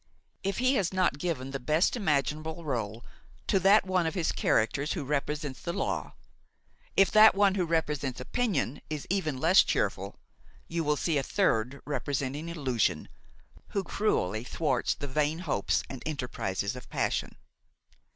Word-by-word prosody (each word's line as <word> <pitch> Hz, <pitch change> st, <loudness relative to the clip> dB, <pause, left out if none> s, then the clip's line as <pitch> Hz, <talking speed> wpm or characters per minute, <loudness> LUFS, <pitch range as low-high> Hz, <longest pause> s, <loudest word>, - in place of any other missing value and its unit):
If 195 Hz, 0 st, -2 dB
he 255 Hz, +2 st, +3 dB
has 185 Hz, -3 st, 0 dB
not 185 Hz, -6 st, +1 dB
given 145 Hz, -6 st, -3 dB
the 135 Hz, -, -3 dB
best 155 Hz, -, +2 dB
imaginable 155 Hz, -, -1 dB
rôle 115 Hz, -6 st, -3 dB, 0.4 s
to 195 Hz, -, +2 dB
that 195 Hz, +3 st, +5 dB
one 185 Hz, -3 st, +1 dB
of 160 Hz, -, -3 dB
his 170 Hz, -3 st, 0 dB
characters 140 Hz, +7 st, +1 dB
who -, -, -3 dB
represents 145 Hz, 0 st, -2 dB
the 170 Hz, -, -3 dB
law, -, -, -2 dB, 0.8 s
if 195 Hz, -2 st, +5 dB
that 215 Hz, -1 st, +8 dB
one 200 Hz, -1 st, +4 dB
who 185 Hz, -3 st, 0 dB
represents 150 Hz, -5 st, -1 dB
opinion 150 Hz, -, -1 dB
is 155 Hz, -2 st, -4 dB
even 155 Hz, -9 st, -1 dB
less 170 Hz, +7 st, +6 dB
cheerful, -, -, -1 dB, 0.5 s
you 165 Hz, 0 st, -2 dB
will 150 Hz, -1 st, +1 dB
see 155 Hz, -2 st, +1 dB
a -, -, 0 dB
third 125 Hz, +1 st, 0 dB
representing 145 Hz, +1 st, -3 dB
illusion, 130 Hz, -, -1 dB, 0.6 s
who 200 Hz, -, -2 dB
cruelly 110 Hz, -, 0 dB
thwarts 130 Hz, -1 st, 0 dB
the 145 Hz, -, -6 dB
vain 150 Hz, +3 st, 0 dB
hopes 155 Hz, -, 0 dB
and 135 Hz, -, -8 dB
enterprises 120 Hz, -8 st, -3 dB
of 125 Hz, -, -10 dB
passion. -, -, -1 dB
150 Hz, 150 wpm, -29 LUFS, 130-180 Hz, 0.8 s, that